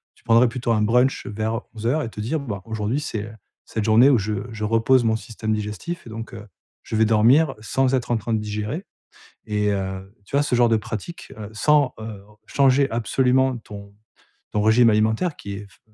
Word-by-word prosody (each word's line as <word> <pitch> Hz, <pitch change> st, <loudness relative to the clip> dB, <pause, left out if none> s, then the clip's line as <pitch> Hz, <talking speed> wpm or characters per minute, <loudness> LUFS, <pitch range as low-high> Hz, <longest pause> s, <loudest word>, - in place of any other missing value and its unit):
tu -, -, -27 dB
prendrais 115 Hz, +1 st, +5 dB
plutôt 120 Hz, 0 st, -2 dB
un 110 Hz, -2 st, +2 dB
brunch 125 Hz, +5 st, +2 dB
vers 110 Hz, +2 st, -2 dB
11:00 120 Hz, +8 st, 0 dB
et 115 Hz, -, -4 dB
te 105 Hz, -, -11 dB
dire, 130 Hz, +9 st, -1 dB
bah, 105 Hz, -9 st, -5 dB
aujourd'hui 110 Hz, +4 st, -2 dB
c'est, 110 Hz, -8 st, -4 dB
heu, 110 Hz, -, -10 dB, 0.3 s
cette 110 Hz, -, -3 dB
journée 115 Hz, +5 st, +6 dB
où 130 Hz, -, +5 dB
je 105 Hz, +1 st, -2 dB, 0.2 s
je 110 Hz, -1 st, -6 dB
repose 115 Hz, +4 st, +3 dB
mon 110 Hz, -1 st, +2 dB
système 110 Hz, -1 st, -4 dB
digestif 105 Hz, +11 st, -5 dB
et -, -, -9 dB
donc, 115 Hz, +1 st, -7 dB
heu, 105 Hz, 0 st, -10 dB, 0.4 s
je -, -, -5 dB
vais 110 Hz, +1 st, +4 dB
dormir 120 Hz, +7 st, +4 dB
sans 130 Hz, +4 st, 0 dB
être 125 Hz, -2 st, -2 dB
en 120 Hz, -, +3 dB
train 110 Hz, +1 st, -3 dB
de 110 Hz, -, +1 dB
digérer 105 Hz, -, -4 dB, 0.6 s
et 105 Hz, -1 st, 0 dB
heu, 95 Hz, 0 st, -5 dB
tu 140 Hz, -, -5 dB
vois 145 Hz, -, +3 dB
ce 145 Hz, -, 0 dB
genre 120 Hz, -1 st, +4 dB
de 115 Hz, -, +3 dB
pratique, 110 Hz, -, -7 dB
heu, 105 Hz, -1 st, -7 dB
sans, 145 Hz, +4 st, +3 dB
heu, 110 Hz, -3 st, -8 dB, 0.2 s
changer 140 Hz, 0 st, +3 dB
absolument 125 Hz, +3 st, +1 dB
ton 100 Hz, -3 st, -11 dB, 0.6 s
ton 105 Hz, -, 0 dB
régime 115 Hz, +2 st, +5 dB
alimentaire 110 Hz, +10 st, +1 dB
qui 100 Hz, -, -7 dB
est 100 Hz, +1 st, -7 dB
fe -, -, -24 dB
110 Hz, 205 wpm, -22 LUFS, 105-125 Hz, 0.6 s, journée